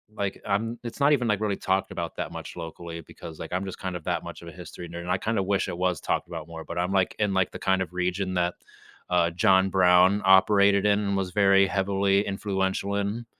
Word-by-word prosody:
like, 100 -1 -3
I'm 115 +3 -1
it's 120 +3 -7
not 145 +1 +4
even, 125 -4 +1
like, 105 -2 +1
really 105 -2 0
talked 95 0 -1
about - - -5
that - - -4
much - - -8
locally 85 0 -7
because, 80 0 -11
like, 80 +2 -7
I'm 95 +1 -1
just 95 - -7
kind 95 -1 -5
of 85 - -6
that - - -1
much - - -9
of 85 - -11
a 85 - -8
history 85 +1 -10
nerd, 85 0 -7
and 90 - -4
I 95 - +1
kinda 110 -2 -1
wish 100 0 0
it - - -5
was 90 -2 0
talked - - -1
about 80 -2 -7
more, 80 -1 -8
but 85 +2 -5
I'm, 90 +2 -1
like, 95 -2 +1
in, 105 -2 +1
like, 95 -1 +1
the - - -8
kind 95 -1 +1
of 90 -1 -11
region 90 +1 -1
that, 90 0 0 0.6
uh, 85 -1 +3
John 95 +1 +3
Brown 95 +1 +4
operated 100 +1 +5
in 105 0 +3
and 100 -1 -1
was 95 -2 -2
very 100 0 +4
heavily 100 +1 +1
influential 95 0 -2
in, 100 +4 -2
95 Hz, 240 wpm, -26 LUFS, 90-100 Hz, 0.6 s, operated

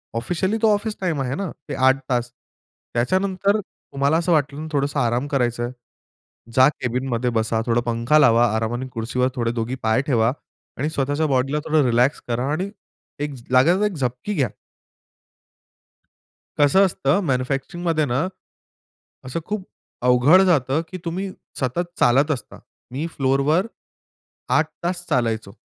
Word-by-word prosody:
Officially 180 - -1
तो 220 -2 +5
office 210 +1 -2
time 165 -7 0
आहे 130 +1 -2
ना, 195 -5 -3 0.2
ते - - -3
8 130 +1 +4
तास. 120 -1 0 0.6
त्याच्यानंतर 190 - +1
तुम्हाला 140 -3 -2
असं 170 +1 0
वाटलं 145 -2 +1
ना 160 - -5
थोडंसं 140 0 0
आराम 120 +3 0
करायचं 120 -4 0
आहे. 120 - -3 0.8
जा 130 +1 +7
कॅबिनमध्ये 125 -2 -2
बसा, 110 -1 0
थोडा 120 0 +2
पंखा 115 +6 +3
लावा 120 -4 +5
आरामाने 120 +3 -2
खुर्चीवर 125 +2 0
थोडे 115 -1 0
दोघी 120 +2 -2
पाय 110 +4 +2
ठेवा 120 -4 +2 0.5
आणि 145 +4 -1
स्वतःच्या 145 +1 0
बॉडीला 135 +1 +1
थोडं 155 -3 +3
रिलॅक्स 125 +4 +2
करा 120 +2 -1
आणि 185 +6 -2 0.5
1 145 -2 -5 0.2
लागायचं 155 +9 +4
तर 210 - +3
एक 210 - -2
झपकी 130 +7 -3
घ्या. 135 -7 +1 2.1
कसं 170 +8 +5
असतं 160 +1 +1
मॅन्युफॅक्चरिंगमध्ये 140 +5 -1
ना, 135 +5 0 1.0
असं 130 +6 -3
खूप 210 -3 -4 0.4
अवघड 125 +9 +6
जातं 145 -3 +2
की 185 - -5
तुम्ही 185 +3 -3 0.3
सतत 160 +7 -1
चालत 140 +5 +4
असता. 125 -8 -5 0.3
मी 140 +5 -3
फ्लोअरवर 140 +8 +2 0.9
8 155 - +2 0.2
तास 175 +1 -2
चालायचो. 110 -4 0
135 Hz, 145 wpm, -22 LUFS, 125-165 Hz, 2.1 s, जा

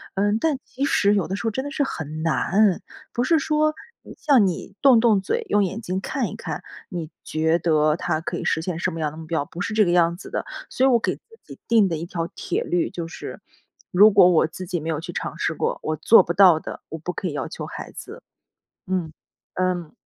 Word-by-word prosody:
嗯， 205 +2 +2
但 300 +3 0
其 265 - -5
实 205 -7 +3
有 195 - 0
的 195 - -2
时 - - -6
候 - - +1
真 260 +5 -3
的 285 - -6
是 295 - -2
很 155 - -5
难， 175 - +2 0.3
不 240 - 0
是 330 +4 +3
说 305 +1 +1 0.4
像 260 -10 +4
你 185 +2 -5
动 260 -5 +7
动 220 -4 +3
嘴， 460 - -2
用 205 - +3
眼 195 +4 -3
睛 190 -3 -3
看 - - -2
一 - - -8
看， - - -6 0.3
你 170 -4 -5
觉 160 +2 +1
得 155 -2 +2
他 165 -2 -1
可 160 - -4
以 - - -5
实 - - +1
现 170 -2 -3
什 185 - 0
么 165 - -6
样 150 -2 -1
的 155 - -12
目 160 - -9
标， 160 -3 -1
不 175 - -8
是 215 - -3
这 215 -2 +5
个 175 - +1
样 170 -1 +3
子 - - -11
的。 - - -2 0.3
所 255 - 0
以 - - +5
我 240 - +5
给 - - -1
自 - - -36 0.2
己 - - -12
定 225 -4 +4
的 170 - -2
一 165 - -5
条 170 -2 -3
铁 - - -2
律 175 -1 0
就 170 -2 -5
是 165 - -8 0.5
如 205 +4 +7
果 195 -3 +6
我 160 -1 +3
自 185 +3 -8
己 175 -2 -2
没 160 - -5
有 155 -2 -1
去 - - -7
尝 - - -4
试 - - -1
过， - - -1
我 155 - -1
做 185 +6 +6
不 170 - -2
到 180 -4 +6
的， - - -8
我 160 - -5
不 175 +3 -5
可 185 - -3
以 160 - -4
要 145 - -3
求 - - -7
孩 - - -8
子。 - - -10 0.6
嗯， 180 -4 -2 0.4
嗯。 180 -3 -2
180 Hz, 265 characters per minute, -23 LUFS, 165-215 Hz, 0.6 s, 动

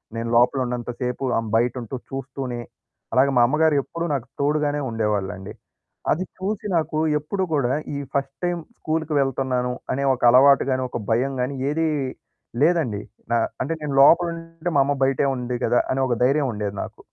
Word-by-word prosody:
నేను 115 0 -3
లోపలున్నంత 125 0 +2
సేపు 125 +2 -2
ఆమె 115 -1 -2
బయటంటూ 120 0 -1
చూస్తూనే, 135 -2 -5 0.5
అలాగ 130 +2 +5
మా - - +6
అమ్మగారు 155 +3 +3
ఎప్పుడూ 170 +4 -4
నాకు 135 -4 -2
తోడుగానే 150 0 +1
ఉండేవాళ్ళండి. 105 -4 -2 0.6
అది 180 - +1
చూసి 200 +3 -3
నాకు 155 -1 -1 0.2
ఎప్పుడూ 190 +6 -2
కూడా 130 -4 +1 0.2
ఈ - - -2 0.2
ఫస్ట్ 135 -1 -1
టైమ్ 175 -1 0 0.2
స్కూల్కి 155 0 -2
వెళ్తున్నాను, 130 -2 0 0.2
అనే 140 +1 -1
ఒక 125 - -6
అలవాటు 135 +3 +6
గాని, 130 0 0
ఒక 120 - -4
భయం 130 +5 +1
గాని 130 +3 -2
ఏదీ 160 +2 +1 0.7
లేదండి. 150 -10 +2 0.3
నా 120 - +4 0.2
అంటే 140 +6 -1
నేను 150 -2 -3
లోపలుంటే 165 +2 +3
మా - - +5
అమ్మ 145 - +1
బయటే 135 +1 +2
ఉంది 125 0 -3
గదా! 120 - +3
అనే 135 - 0
ఒక 120 - +1
ధైర్యముండేది 125 -7 0
నాకు. - - -10
135 Hz, 160 wpm, -23 LUFS, 125-150 Hz, 0.7 s, మా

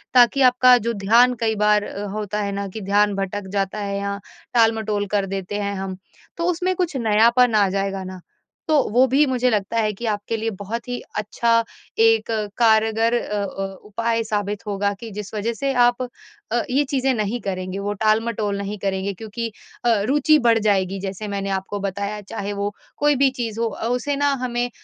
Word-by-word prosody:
ताकि 250 +2 +6
आपका 250 0 +6
जो 235 - +1
ध्यान 230 +5 +4
कई 220 -1 +1
बार 210 0 +3
अ, 200 +1 -6
होता 210 0 -3
है 200 - -2
ना 200 0 -3
कि 220 +3 -7
ध्यान 205 +1 +2
भटक 195 0 -3
जाता 200 +1 -1
है 200 -1 -2
या 200 0 -3 0.4
टाल-मटोल 220 -3 +2
कर 200 -1 +2
देते 195 +2 -4
हैं 200 0 -2
हम, 190 -1 -5 0.4
तो 335 - -2
उसमें 365 +2 -1
कुछ 355 -4 -1
नयापन 235 +1 +4
आ 205 -2 +4
जाएगा 195 0 -2
ना, 185 -1 -8 0.5
तो 305 -4 +4
वो 250 +4 +5
भी 275 +4 +4
मुझे 255 -1 +1
लगता 210 +1 -1
है 215 -1 +1
कि 235 +4 -7
आपके 205 +2 -3
लिए 225 +1 -1
बहुत 230 +5 -5
ही 245 - -2 0.2
अच्छा 230 +2 +1 0.4
एक 225 0 +4 0.3
कारगर 225 0 +3
अ 210 -1 -2
अ, 195 0 -4 0.2
उपाय 230 +2 -1
साबित 205 -1 -3
होगा 200 0 0
कि 230 -2 -7
जिस 210 +1 -7
वजह 225 +3 -1
से 275 +3 -1
आप 245 0 +3 0.5
अ, 240 - +2
ये 275 +3 +2
चीजें 265 -1 +1
नहीं 215 +1 -1
करेंगे, 185 -1 -4
वो 205 +1 -2
टाल-मटोल 215 0 0
नहीं 200 +1 -4
करेंगे। 195 0 -2
क्योंकि 225 +4 -5 0.4
अ, - - +4 0.2
रुचि 295 +2 +4
बढ़ 230 -3 +4
जाएगी 195 -2 +1
जैसे 195 +2 -5
मैंने 195 -1 -3
आपको 195 +1 -3
बताया 200 +2 -3
चाहे 205 0 -5
वो 200 0 -2 0.3
कोई 295 0 +3
भी 275 0 +4
चीज़ 230 -3 -4
हो 230 - +2
अ, 225 +1 -4
उसे 250 +4 -1
ना 285 0 +2
हमें, 245 0 -1
215 Hz, 195 wpm, -22 LUFS, 200-235 Hz, 0.5 s, ताकि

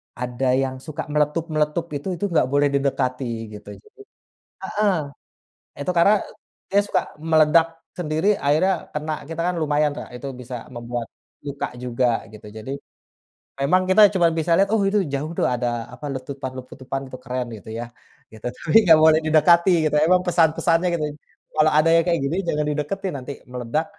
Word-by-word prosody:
ada 125 +1 -1
yang 130 0 -1
suka 155 +3 -6
meletup-meletup 150 +1 0
itu 145 - -5
itu 175 +4 -4
nggak 165 -6 +3
boleh 145 0 +3
didekati 135 -2 0 0.3
gitu. - - -17
Jadi 430 -1 -20 0.7
heeh, 210 -2 +2 0.9
itu 145 - -3
karena 200 +5 +6 0.5
dia 200 +1 +4
suka - - +1 0.2
meledak 160 +1 +4 0.3
sendiri, 160 +1 -1
akhirnya 155 +7 +2 0.2
kena 155 +1 -3
kita, 165 +2 -5
kan 180 - -1
lumayan, 150 -1 +2
Kak, - - -7
itu 140 - -7
bisa 125 +1 -7
membuat 120 -1 -5 0.4
luka 140 -1 -3 0.2
juga 125 0 0 0.3
gitu, 105 - -13
jadi 110 +5 -7 0.9
memang 180 +7 +3
kita 190 +3 +6
cuma 175 -3 +4
bisa 165 +1 -2
lihat, 195 +1 +3
oh 220 - +3
itu 205 +1 +2
jauh 150 +4 -2
tuh - - +2
ada 125 0 -1 0.3
apa, 145 +4 -9
letupan-letupan 130 0 -6
itu 130 - -8
keren 125 -1 -3
gitu 105 - -13
ya, 120 - -4 0.5
gitu. 110 - -12
Tapi 155 - -3
nggak 160 -2 +7
boleh 160 0 +6
didekati, 170 +4 +5 0.2
memang 155 +5 +3
pesan-pesannya 165 +1 +2
gitu. 165 - -1 0.5
"Kalau 155 0 +4
ada 155 +2 +4
yang 165 - +4
kayak 170 -1 +1
gini, 150 +5 -1
jangan 150 -2 0
dideketin, 175 +6 -3
nanti 130 +2 -7 0.2
meledak, 125 +5 -2
150 Hz, 160 wpm, -22 LUFS, 130-170 Hz, 0.9 s, nggak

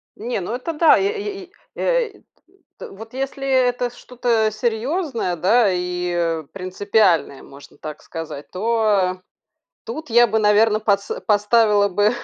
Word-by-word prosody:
Не, 235 -1 -3
ну 195 +6 -4
это 325 +6 -4
да. 315 +1 +5
Е 410 +1 -1
е 400 -2 -6
и, 360 - -27 0.2
э, - - +1 0.7
т - - -8
т - - -14
вот 225 +4 -11
если, 270 +1 -4
э, 260 -2 +3
это 245 0 -2
что-то, 240 -2 -1
а, - - -1
серьезное, 235 - -2
да, 200 +5 +3
и, 180 0 -2
э, 165 -2 -1
принципиальное, 185 -5 0
можно 140 0 -15
так 155 -1 -8
сказать, 160 -3 -8
то 205 -3 +1 0.6
тут 315 - -7
я 240 +1 +6
бы, 220 0 0
наверно, 210 +1 +4
подс 200 -2 0 0.2
поставила 210 -1 +3
бы 205 +3 +2
220 Hz, 155 wpm, -21 LUFS, 185-250 Hz, 0.7 s, я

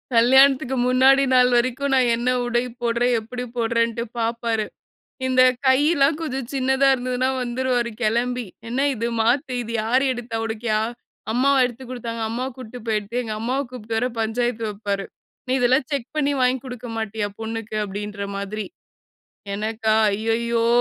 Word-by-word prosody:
கல்யாணத்துக்கு 265 +2 +5
முன்னாடி 265 +2 +5
நாள் 250 0 +6
வரைக்கும், 255 +3 +1
நான் 250 -2 +3
என்ன 240 +2 -1 0.2
உடை 240 0 +1 0.2
போடுறேன் 240 +1 +1
எப்டி 250 +3 -6
போடுறேன்னுட்டு 230 0 +1 0.2
பார்ப்பாரு. 230 -1 -1 0.6
இந்த 255 0 +4 0.2
கையெல்லாம் 290 +2 +4
கொஞ்சம் 265 -6 -4
சின்னதா 265 +1 +2
இருந்ததுனா 255 0 -1
வந்துருவாரு 245 -1 -1
கிளம்பி 240 +2 0 0.2
என்ன 270 +4 +1
இது 230 +1 -2
மாத்து 255 +4 +1
இது 230 0 -6
யாரு 255 +4 +2
எடுத்தா 235 -2 -5
உனக்குயா, 220 -1 -1 0.5
அம்மாவா 270 +3 +3
எடுத்துக் 250 +1 -9
குடுத்தாங்க? 230 -2 -5
அம்மா 250 +3 -2
கூட்டிட்டு 250 -1 -9
போயி 215 -1 +2
எடுத்திய 235 +5 -3
எங்க 215 -1 -4
அம்மாவ 255 +4 -1
கூப்பிட்டு 225 -2 -4
வர 250 +2 +1
பஞ்சாயத்து 230 +1 -1
வைப்பாரு. 200 -1 -3 0.4
நீ - - +1
இதெல்லாம் 255 +2 +3
செக் 270 -3 -2
பண்ணி 285 -1 +2
வாங்கி 255 +1 +3
குடுக்க 250 -2 -7
மாட்டியா 215 -1 -2
பொண்ணுக்கு 225 -1 -4
அப்டின்ற 205 0 -5
மாதிரி. 205 +2 -4 0.9
எனக்கா 220 +1 0 0.2
ஐயயோ! 230 +2 0
240 Hz, 145 wpm, -22 LUFS, 225-255 Hz, 0.9 s, நாள்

